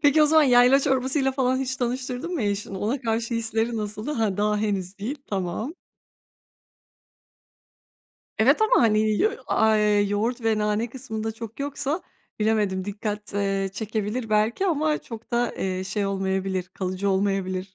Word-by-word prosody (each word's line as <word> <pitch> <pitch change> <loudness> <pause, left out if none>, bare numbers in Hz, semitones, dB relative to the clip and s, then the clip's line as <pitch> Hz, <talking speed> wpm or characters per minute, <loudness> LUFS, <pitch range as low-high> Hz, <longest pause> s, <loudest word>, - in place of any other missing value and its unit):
Peki, 295 +1 +5
o - - +6
zaman 315 +1 +5
yayla 250 0 +6
çorbasıyla 265 0 +1
falan 260 -1 +1
hiç 260 -1 -2
tanıştırdın 255 +6 -3
mı 300 - -1
eşini? 200 -1 -2
Ona 230 +8 -1
karşı 230 0 -1
hisleri 225 0 -1
nasıldı? 215 +5 -4
Hıı, 220 -8 0
daha, 210 0 +1
henüz 200 -3 -2
değil. 235 +9 -3
Tamam. 195 - -3 2.6
Evet 260 - +4
ama, 435 - +4
hani, 215 -2 +3
ya, 420 - +2 0.2
a 220 0 +3
eee, 210 -1 +3
yoğurt 210 +5 -1
ve 225 -1 +2
nane 210 +2 0
kısmında 225 -3 -4
çok 225 +1 -9
yoksa, 285 +3 -2 0.4
bilemedim 210 -3 +1
dikkat, 210 0 -4
eee, 195 -1 0
çekebilir 220 +2 -3
belki 215 - +2
ama 310 -3 +1
çok 230 0 -10
da, 240 0 0
eee, 185 -1 -2
şey 200 +2 -2
olmayabilir, 190 -1 -1
kalıcı 185 +1 -2
olmayabilir. 190 -1 -1
220 Hz, 150 wpm, -25 LUFS, 205-255 Hz, 2.6 s, o